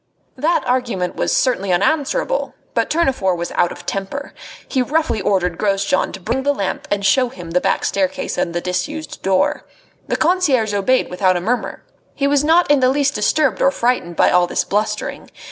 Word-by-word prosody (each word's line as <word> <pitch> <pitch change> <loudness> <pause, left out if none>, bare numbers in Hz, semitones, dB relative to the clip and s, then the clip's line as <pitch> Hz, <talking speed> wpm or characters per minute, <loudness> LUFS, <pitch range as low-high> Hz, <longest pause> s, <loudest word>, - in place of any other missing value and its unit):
That 310 +6 +1
argument 240 -8 -1
was - - -1
certainly 200 -8 +1
unanswerable. 315 - 0 0.2
But - - 0
Tournefort 265 - +1
was 170 0 -4
out 175 - +1
of - - -10
temper. 195 +9 -4 0.3
He 260 - 0
roughly 305 -4 0
ordered 180 -3 0
Grosjean 195 -2 +1
to 190 - -7
bring 230 +8 -2
the 285 +1 +1
lamp 195 -6 -3
and 200 -1 -1
show 250 +5 +3
him 175 -6 -10
the 180 +1 +2
back - - 0
staircase 190 -2 -1
and 170 - -2
the 175 - -1
disused 295 - -4
door. 190 0 +1 0.4
The - - -1
concierge 300 - +2
obeyed 205 +5 +1
without 185 0 +2
a - - -1
murmur. 230 +8 -2 0.3
He 280 - -1
was 285 0 +2
not 325 +1 +4
in 290 - +5
the 255 -1 +3
least 280 +1 +1
disturbed 275 +7 +1
or - - +5
frightened 240 -10 -1
by - - +4
all 180 0 +4
this - - 0
blustering. 210 +2 -2
225 Hz, 185 wpm, -19 LUFS, 190-280 Hz, 0.4 s, in